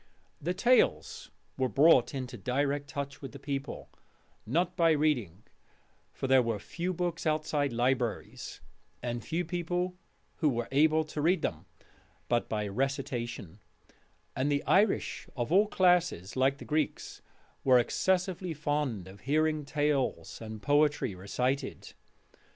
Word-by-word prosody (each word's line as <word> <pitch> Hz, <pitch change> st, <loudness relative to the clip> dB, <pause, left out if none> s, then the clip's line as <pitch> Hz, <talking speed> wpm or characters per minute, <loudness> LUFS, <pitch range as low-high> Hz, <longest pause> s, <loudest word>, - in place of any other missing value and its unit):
The 175 Hz, +4 st, -1 dB
tales 245 Hz, +6 st, +2 dB, 0.3 s
were 130 Hz, -1 st, +2 dB
brought 135 Hz, +2 st, +5 dB
into 130 Hz, -1 st, -5 dB
direct 140 Hz, +6 st, -1 dB
touch 140 Hz, 0 st, -5 dB
with 135 Hz, -4 st, -8 dB
the 140 Hz, -, -9 dB
people, 140 Hz, -1 st, -5 dB, 0.6 s
not 175 Hz, +8 st, 0 dB
by 165 Hz, -2 st, +4 dB
reading 125 Hz, -, 0 dB, 0.7 s
for -, -, -5 dB
there 130 Hz, -1 st, +5 dB
were 115 Hz, -3 st, -1 dB
few 175 Hz, -, -4 dB
books 175 Hz, -2 st, -2 dB
outside 150 Hz, -2 st, 0 dB
libraries, 120 Hz, -1 st, -2 dB, 0.4 s
and 120 Hz, -1 st, -3 dB
few 175 Hz, +2 st, -2 dB
people 175 Hz, +1 st, -2 dB, 0.5 s
were 120 Hz, -7 st, +1 dB
able 155 Hz, +3 st, +4 dB
to 150 Hz, -1 st, -5 dB
read 175 Hz, +5 st, +2 dB
them -, -, -3 dB, 0.6 s
but 120 Hz, -1 st, +1 dB
by 105 Hz, -1 st, -1 dB
Recitation: 120 Hz, -, -3 dB, 0.8 s
and 135 Hz, +3 st, 0 dB
the 145 Hz, 0 st, +1 dB
Irish 200 Hz, +1 st, +2 dB
of 120 Hz, +3 st, -2 dB
all 200 Hz, +4 st, +5 dB
classes, 180 Hz, -, +2 dB
like 135 Hz, +1 st, +2 dB
the -, -, -10 dB
Greeks, 155 Hz, 0 st, -2 dB, 0.4 s
were 130 Hz, -2 st, +6 dB
excessively 180 Hz, +6 st, 0 dB
fond 145 Hz, -10 st, -2 dB
of 95 Hz, +1 st, -12 dB
hearing 155 Hz, +4 st, +1 dB
tales 145 Hz, -5 st, -1 dB
and 110 Hz, -1 st, -8 dB
poetry 145 Hz, -5 st, +2 dB
recited. 125 Hz, +9 st, -3 dB
140 Hz, 130 wpm, -30 LUFS, 125-160 Hz, 0.8 s, were